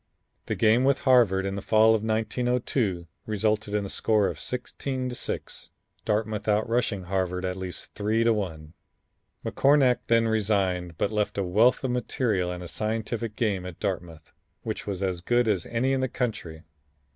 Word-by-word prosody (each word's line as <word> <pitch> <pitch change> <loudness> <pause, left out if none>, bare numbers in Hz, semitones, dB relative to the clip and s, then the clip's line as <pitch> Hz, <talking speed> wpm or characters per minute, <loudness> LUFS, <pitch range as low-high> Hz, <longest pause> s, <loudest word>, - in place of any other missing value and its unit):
The - - -1
game 115 +3 +4
with 140 0 +2
Harvard 115 -8 +4
in 100 - -2
the 100 - -4
fall 110 +2 +5
of 110 - +1
1902 110 -3 0 0.2
resulted 105 0 0
in 105 -1 0
a - - -4
score 105 0 +2
of - - -6
16 130 +1 -4
to - - -5
6, - - -5 0.4
Dartmouth 105 0 -1
out 105 +1 +2
rushing 115 -4 0
Harvard 90 0 -2
at 90 0 -2
least 95 -1 -5
3 110 +2 +1
to 115 0 +4
1. 80 -7 -4 0.7
McCornack 135 -3 +4
then 115 0 +3
resigned, 95 -6 0
but 100 - 0
left 105 -1 -1
a 100 - +1
wealth 110 +10 +3
of 130 - 0
material 110 -6 0
and 90 0 -6
a - - -7
scientific 110 +2 -3
game 100 -6 0
at 90 -2 -8
Dartmouth, 85 -6 -4 0.3
which - - -4
was 100 -1 -3
as 90 -2 -1
good 120 +5 +2
as 100 -6 0
any 125 +3 0
in 135 - 0
the 130 - 0
country. 95 -11 -4
110 Hz, 175 wpm, -26 LUFS, 95-115 Hz, 0.7 s, fall